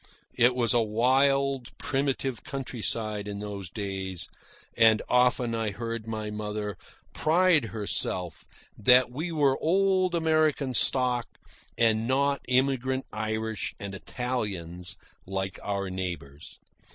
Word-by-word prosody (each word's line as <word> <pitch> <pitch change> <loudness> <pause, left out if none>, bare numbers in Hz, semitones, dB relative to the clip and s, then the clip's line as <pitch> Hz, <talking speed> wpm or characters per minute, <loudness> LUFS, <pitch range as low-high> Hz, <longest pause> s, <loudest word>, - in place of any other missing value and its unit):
It 125 +1 +4
was 120 -2 +2
a 120 - +4
wild, 135 +4 +2
primitive 135 -2 -1
countryside 110 -5 -2
in 100 -1 -4
those 100 -3 -6
days; 95 -3 -4 0.5
and 110 -1 +6
often 125 -1 +3
I 115 -1 0
heard 115 +2 -5
my 110 -1 -3
mother 105 -1 -4 0.4
pride 165 -3 +3
herself 100 -5 -3 0.3
that 125 +3 +5
we 155 +7 -3
were 145 -4 +2
old 185 +1 +2
American 155 -4 +2
stock 125 0 +2 0.5
and 115 -1 +3
not 140 +1 +2
immigrant 130 +1 +1
Irish 110 0 -2
and 100 -1 -6
Italians 100 -7 -3 0.3
like 95 0 -3
our 100 -2 -2
neighbours. 90 -6 -6
115 Hz, 115 wpm, -28 LUFS, 105-135 Hz, 0.5 s, and